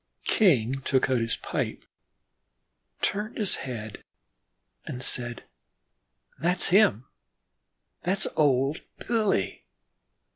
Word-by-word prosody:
King 135 Hz, -, +3 dB
took 130 Hz, 0 st, +1 dB
out 130 Hz, -, +3 dB
his 115 Hz, 0 st, -1 dB
pipe, -, -, -4 dB, 1.2 s
turned 210 Hz, +3 st, -1 dB
his 210 Hz, -4 st, +2 dB
head 110 Hz, -5 st, -7 dB, 0.8 s
and 125 Hz, 0 st, -5 dB
said: 120 Hz, -1 st, 0 dB, 1.0 s
"That's 180 Hz, +2 st, +2 dB
him 175 Hz, -, +4 dB, 1.0 s
that's 190 Hz, +3 st, 0 dB
old 140 Hz, 0 st, +2 dB, 0.2 s
Billy. 215 Hz, -, 0 dB
135 Hz, 85 wpm, -27 LUFS, 120-195 Hz, 1.2 s, him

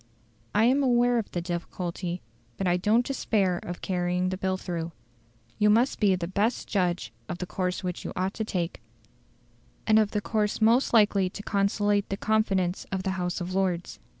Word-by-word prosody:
I 210 Hz, -, +5 dB
am 265 Hz, +4 st, +4 dB
aware 245 Hz, -2 st, +3 dB
of 220 Hz, -, -4 dB
the 175 Hz, -, -3 dB
difficulty, 175 Hz, 0 st, -4 dB, 0.3 s
but 195 Hz, -, -2 dB
I 175 Hz, -1 st, +3 dB
don't 215 Hz, +7 st, +2 dB
despair 200 Hz, -9 st, 0 dB
of 175 Hz, 0 st, -7 dB
carrying 180 Hz, 0 st, 0 dB
the 185 Hz, -, -3 dB
bill 190 Hz, 0 st, -1 dB
through. 170 Hz, -3 st, -4 dB, 0.7 s
You 210 Hz, -, +5 dB
must 235 Hz, +5 st, +3 dB
be 200 Hz, -3 st, +4 dB
the 175 Hz, -2 st, -3 dB
best 205 Hz, +6 st, 0 dB
judge 175 Hz, -, -1 dB, 0.2 s
of 175 Hz, -, -3 dB
the 180 Hz, -, -4 dB
course 180 Hz, +1 st, -2 dB
which 180 Hz, -1 st, -4 dB
you -, -, -5 dB
ought 185 Hz, +2 st, -1 dB
to 220 Hz, -, -3 dB
take, 180 Hz, -, -3 dB, 1.0 s
and 220 Hz, 0 st, +5 dB
of 215 Hz, -2 st, +2 dB
the 210 Hz, -, -1 dB
course 210 Hz, -1 st, 0 dB
most 230 Hz, +4 st, +4 dB
likely 205 Hz, -4 st, +4 dB
to 205 Hz, -, -8 dB
conciliate 205 Hz, 0 st, +1 dB
the 195 Hz, -, -2 dB
confidence 195 Hz, -5 st, 0 dB
of 190 Hz, -1 st, -2 dB
the 190 Hz, -, 0 dB
House 180 Hz, 0 st, -2 dB
of 180 Hz, +1 st, -4 dB
Lords. 185 Hz, -3 st, -1 dB
190 Hz, 185 wpm, -27 LUFS, 180-215 Hz, 1.0 s, I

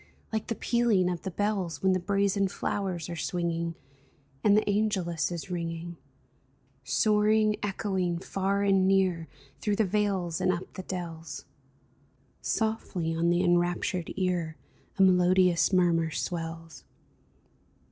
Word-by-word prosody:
Like 220 Hz, -, -2 dB
the 230 Hz, -, -2 dB
pealing 220 Hz, -6 st, +2 dB
of 175 Hz, -, -4 dB
the 190 Hz, -, -4 dB
bells 195 Hz, -2 st, -2 dB
When 190 Hz, -, +4 dB
the 185 Hz, -, +2 dB
brazen 200 Hz, +1 st, +1 dB
flowers 185 Hz, -3 st, -3 dB
are 175 Hz, -, -5 dB
swinging 170 Hz, 0 st, -2 dB, 0.7 s
And 205 Hz, 0 st, +5 dB
the 215 Hz, -, +1 dB
angelus 195 Hz, -6 st, 0 dB
is 175 Hz, +2 st, -6 dB
ringing, 170 Hz, 0 st, -4 dB, 0.9 s
Soaring, 210 Hz, -, +3 dB
echoing, 190 Hz, -3 st, -1 dB
far 195 Hz, +2 st, -1 dB
and 195 Hz, -1 st, +3 dB
near. 185 Hz, -4 st, +2 dB, 0.3 s
Through 210 Hz, -1 st, 0 dB
the 220 Hz, -, +2 dB
vales 190 Hz, -4 st, 0 dB
and 185 Hz, -, +3 dB
up 175 Hz, 0 st, -5 dB
the 185 Hz, -, -6 dB
dells 170 Hz, -3 st, -6 dB, 0.5 s
— -, -, -37 dB, 0.2 s
Softly 220 Hz, -7 st, -1 dB
on 170 Hz, +1 st, +1 dB
the 175 Hz, +1 st, +2 dB
enraptured 175 Hz, 0 st, +1 dB
ear 175 Hz, -4 st, -1 dB, 0.4 s
A 195 Hz, -, +5 dB
melodious 180 Hz, -2 st, +4 dB
murmur 170 Hz, -3 st, +3 dB
swells 165 Hz, 0 st, -5 dB
185 Hz, 130 wpm, -28 LUFS, 170-200 Hz, 0.9 s, And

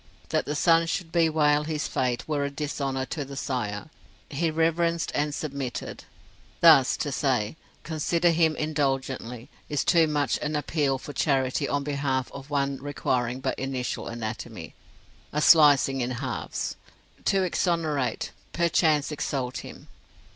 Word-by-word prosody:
That -, -, 0 dB
the 150 Hz, -, -2 dB
son 165 Hz, +2 st, +4 dB
should 165 Hz, 0 st, -3 dB
bewail 155 Hz, -3 st, +3 dB
his 155 Hz, -1 st, -2 dB
fate 125 Hz, -2 st, -1 dB
were 150 Hz, -2 st, 0 dB
a 140 Hz, -, -1 dB
dishonour 140 Hz, -2 st, -3 dB
to 145 Hz, +3 st, -4 dB
the 140 Hz, 0 st, -9 dB
sire. 125 Hz, 0 st, -3 dB, 0.4 s
He 160 Hz, +4 st, 0 dB
reverenced, 165 Hz, +1 st, +1 dB
and 150 Hz, +1 st, 0 dB
submitted. 140 Hz, -4 st, -5 dB, 0.5 s
Thus, -, -, +7 dB
to -, -, -2 dB
say, 105 Hz, +6 st, 0 dB, 0.3 s
consider 170 Hz, +2 st, +1 dB
him 160 Hz, -1 st, +3 dB
indulgently, 135 Hz, -5 st, -2 dB, 0.2 s
is 145 Hz, -2 st, 0 dB
too 165 Hz, -2 st, +5 dB
much 145 Hz, -2 st, 0 dB
an 150 Hz, +1 st, -2 dB
appeal 145 Hz, -2 st, 0 dB
for 145 Hz, +2 st, -9 dB
charity 135 Hz, -4 st, +1 dB
on 145 Hz, 0 st, 0 dB
behalf 140 Hz, -3 st, -1 dB
of 140 Hz, 0 st, -10 dB
one 140 Hz, -1 st, 0 dB
requiring 130 Hz, -3 st, -2 dB
but -, -, -2 dB
initial 130 Hz, -2 st, -3 dB
anatomy 110 Hz, -6 st, -6 dB, 0.6 s
a 150 Hz, -, -1 dB
slicing 145 Hz, -4 st, +6 dB
in 120 Hz, -, -1 dB
halves 130 Hz, -1 st, -4 dB, 0.5 s
to 195 Hz, -1 st, +3 dB
exonerate, 165 Hz, -6 st, 0 dB, 0.2 s
perchance 160 Hz, -3 st, +2 dB
exalt 135 Hz, -3 st, -2 dB
him. -, -, -11 dB
145 Hz, 140 wpm, -26 LUFS, 130-155 Hz, 0.6 s, Thus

